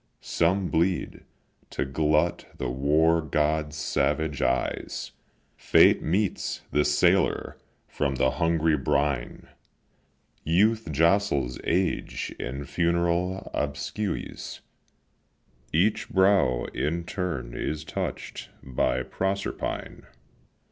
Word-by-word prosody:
Some 90 +3 +1
bleed, 85 +2 0 0.4
to - - -2
glut 75 +4 +1
the - - -2
war 80 +5 +3
god's 75 0 0
savage 75 0 0
eyes; - - -1 0.4
Fate - - +5
meets 95 +5 -1
the 75 - +3
sailor 85 +5 +2 0.3
from 70 -2 -1
the 65 0 +2
hungry 80 +3 +2
brine; 70 -2 -1 1.0
Youth 105 +3 +2
jostles 80 -5 +2
age 90 0 -1
in 70 +3 -4
funeral 85 +3 0
obsequies; 75 +8 -4 1.1
Each 95 +7 +1
brow 95 -10 +3
in 85 +3 -1
turn 90 -9 -4
is 75 0 -3
touch'd 75 - -5 0.2
by 65 -1 0
Proserpine. 95 +5 -3
80 Hz, 90 wpm, -26 LUFS, 70-90 Hz, 1.1 s, Fate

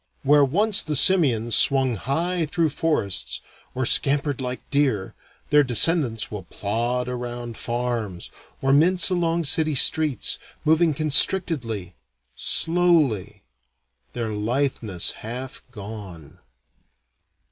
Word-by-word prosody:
Where 145 +1 +4
once 200 +10 +2
the 155 -1 -4
simians 130 - +3
swung 135 -2 +3
high 165 - -2
through 165 +1 0
forests, 150 - -2 0.4
or 130 0 -1
scampered 140 +1 +2
like 125 0 -6
deer, 135 -10 0 0.4
their 150 0 +5
descendants 125 - +1
will 105 -2 -6
plod 120 +7 -3
around 120 -1 -6
farms, 120 -7 -4 0.3
or 135 0 +2
mince 180 +6 +3
along 170 -1 0
city 155 0 +1
streets, 150 -2 +2 0.3
moving 160 0 +3
constrictedly, 145 - +2 0.4
slowly, 165 - 0 0.7
their 115 -2 -4
litheness 110 -3 -2
half 125 +4 -7
gone. 100 -8 -10
135 Hz, 105 wpm, -23 LUFS, 115-160 Hz, 0.7 s, their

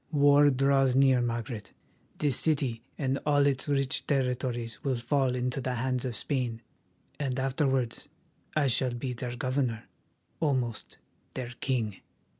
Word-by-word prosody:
War 145 -1 +6
draws 135 -1 +3
near, 135 -2 +5
Margaret; 115 -2 -3 0.4
this 145 -4 +1
city 135 -8 0 0.2
and 135 -1 0
all 145 -1 +3
its 135 -1 +1
rich 140 -2 0
territories 125 -3 -1
will 135 -4 0
fall 130 +1 +1
into 125 +2 -1
the 130 0 -2
hands 125 +1 -1
of 125 -2 -3
Spain, 120 -3 -2 0.6
and 135 -3 -1
afterwards 135 -3 0 0.5
I 155 -2 +3
shall 125 -1 +1
be 125 +1 -3
their 120 0 -5
governor, 125 -2 -1 0.6
almost 130 -7 -1 0.4
their 125 -1 -4
king." 115 -7 -1
130 Hz, 135 wpm, -29 LUFS, 120-140 Hz, 0.6 s, War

